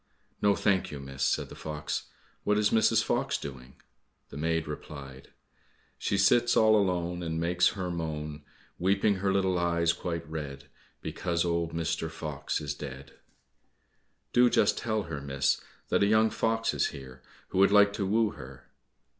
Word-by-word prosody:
"No, 100 -1 +4
thank 100 -3 +1
you, 70 - -7
miss," 70 -1 -8
said - - +1
the - - -10
fox, 75 -1 -4 0.4
"what 105 0 +2
is 105 0 +2
Mrs. 110 - +4
Fox - - 0
doing?" 65 -2 -9 0.5
The - - -11
maid 80 +1 0
replied, 70 -3 -8 0.7
"She 100 - 0
sits 120 +5 +4
all 110 -1 +6
alone, 90 -3 0
And 80 -1 -2
makes 90 +2 +3
her 90 -2 -2
moan, 75 -3 -4 0.4
Weeping 100 +2 +2
her 95 +1 0
little 95 -2 +1
eyes 85 -1 +2
quite 85 -3 -4
red, 75 -3 -6 0.4
Because 85 -1 -1
old 85 -1 -1
Mr. 80 0 -2
Fox 75 -3 -4
is 70 -1 -3
dead." 70 -1 -9 1.2
"Do 125 0 +6
just 105 - +3
tell 110 -2 -1
her, 80 -5 -6
miss, 70 0 0 0.3
that - - +2
a 100 - +4
young 110 +1 +4
fox 115 0 0
is - - +1
here, 65 -3 -10 0.3
who 95 - -1
would 100 +1 +6
like 100 0 +6
to 100 - -2
woo 110 +1 +2
her." 65 +1 -12
85 Hz, 165 wpm, -29 LUFS, 75-100 Hz, 1.2 s, all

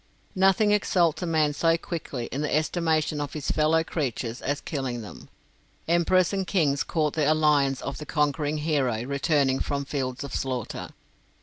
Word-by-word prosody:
Nothing 195 +2 +3
exalts 180 -6 +2
a 175 - -2
man 155 -2 +2
so 165 +2 +2
quickly 155 -8 -5
in 140 - -2
the 150 - -2
estimation 155 -1 0
of 145 -1 -4
his 150 -3 -3
fellow 160 +1 +3
creatures 125 -7 -3
as 145 +1 -1
killing 130 -6 -4
them. 105 - -11 0.6
Emperors 175 +2 +3
and 190 -2 -1
kings 145 -8 +1
court 155 -3 0
the 155 -1 +2
alliance 150 -4 +2
of 140 - -5
the 150 - -8
conquering 150 0 0
hero 140 -7 0
returning 140 0 +1
from 140 -1 -2
fields 135 -2 -3
of 140 - -7
slaughter. 130 -4 -3
150 Hz, 165 wpm, -26 LUFS, 140-165 Hz, 0.6 s, Nothing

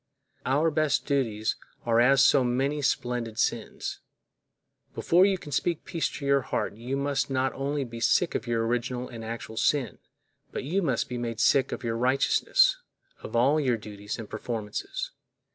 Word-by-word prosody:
Our 150 +5 +2
best 155 -1 +1
duties 115 -7 0 0.3
are 115 -1 +3
as 135 +3 +6
so 135 - +5
many 135 +4 0
splendid 120 -4 -1
sins. - - -2 1.0
Before 180 +3 +4
you 195 -1 +1
can 150 -4 -11
speak 165 +4 -1
peace 165 - -1
to 140 - -6
your 140 0 +3
heart 120 - -2
you 125 +5 -3
must 140 0 0
not 130 0 0
only 140 +1 -2
be 115 -2 -8
sick 170 +8 +2
of - - -3
your 115 -1 0
original 120 +1 -2
and 115 -2 -8
actual 110 0 -6
sin, 140 -1 +1 0.5
but - - -4
you 175 +9 0
must 135 -9 0
be 125 -1 -4
made 115 -2 -4
sick 135 -1 +3
of - - -5
your 115 -1 -1
righteousness, 320 - +3 0.4
of - - -7
all 135 +6 +4
your 130 -5 +1
duties 105 -1 -7
and 115 -2 -7
performances. 110 -3 -4
130 Hz, 170 wpm, -27 LUFS, 115-140 Hz, 1.0 s, as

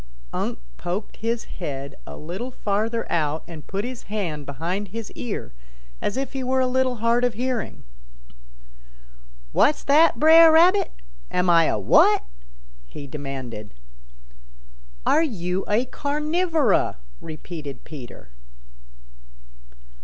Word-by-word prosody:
Unc' - - -2 0.2
poked 185 +5 -4
his 230 +1 -1
head 140 -5 -6
a - - -8
little 185 +11 -5
farther 225 0 -1
out 155 -1 0
and 160 -3 -10
put 200 +2 -3
his 250 -1 -7
hand 170 -9 -3
behind 170 +9 -3
his 225 +3 -7
ear 225 - -5 0.5
as 205 - -2
if 270 0 -3
he 265 -1 -3
were 260 +1 +1
a 260 - +3
little 255 0 +1
hard 230 +2 +2
of 245 -3 +1
hearing. 250 -1 -3 1.7
"What's 295 - +3
that, 310 +3 +5
Bre'r 320 +1 +8
Rabbit? 360 +4 +5 0.4
Am 180 0 +2
I 165 -1 +6
a - - +1
what?" 100 -8 +5 0.6
he 145 - -9
demanded. 130 - -7 1.3
"Are - - +4
you 185 - -1
a 220 +5 +2
Carnivora?" 300 - +1 0.2
repeated 155 -2 -8
Peter. 125 - -10
210 Hz, 120 wpm, -24 LUFS, 160-260 Hz, 1.7 s, Bre'r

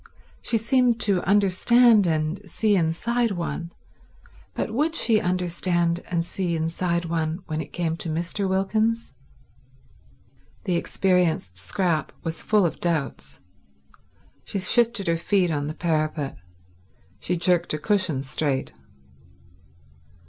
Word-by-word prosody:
She 230 - +2
seemed 240 +1 +2
to 195 -4 +2
understand 205 +3 +4
and 155 +3 -1
see 210 +4 +1
inside 230 +8 +1
one, 175 -2 -4 0.8
but - - -2
would 310 +6 0
she 225 -8 +3
understand 175 -1 0
and 170 -2 -1
see 175 -1 -2
inside 170 +2 -1
one 165 +1 -2
when 155 0 -3
it 150 - -9
came 165 -2 -2
to 170 - -4
Mr. 170 +5 -2
Wilkins? 215 +4 0 1.5
The 180 - 0
experienced 170 - 0
Scrap 155 - -1
was 165 -1 -4
full 210 -3 +3
of 165 - -2
doubts. 160 -6 -2 1.0
She - - -4
shifted 230 +1 +3
her 165 0 +1
feet 180 0 +1
on 145 -2 -2
the 155 - -5
parapet; 155 -4 -1 0.8
she 180 - -2
jerked 175 0 +2
a - - -2
cushion 185 -6 0
straight. 135 - -2
175 Hz, 120 wpm, -24 LUFS, 160-205 Hz, 1.5 s, understand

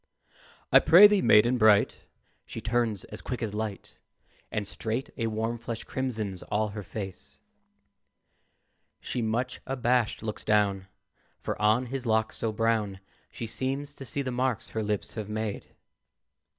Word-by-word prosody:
"I - - +9
prithee, 205 +3 +8
maiden 120 0 +5
bright," 105 -2 +4 0.5
She - - -6
turns 115 -4 0
as 105 - -9
quick 125 -2 -4
as 105 -2 -3
light, 105 -1 -5 0.5
And 105 -2 -2
straight 115 +7 -4
a 115 -3 -1
warm 115 +2 -2
flush 115 -1 -5
crimsons 110 -8 -3
all 105 +1 -1
her 105 +1 -6
face. 95 -1 -8 1.6
She, 125 - -3
much 120 +3 -2
abashed, 125 -4 +1
looks 110 -1 -5
down, 100 -3 +1 0.5
For - - -3
on 110 +4 +3
his 130 0 -5
locks 110 0 +1
so 110 - -1
brown 110 -3 0 0.3
She - - -6
seems 135 +5 -3
to 140 - -10
see 140 +3 -2
the 130 - -3
marks 125 -2 -1
her 110 - -3
lips 105 -1 -2
have 105 -2 -5
made. 110 -1 -3
110 Hz, 145 wpm, -28 LUFS, 105-125 Hz, 1.6 s, I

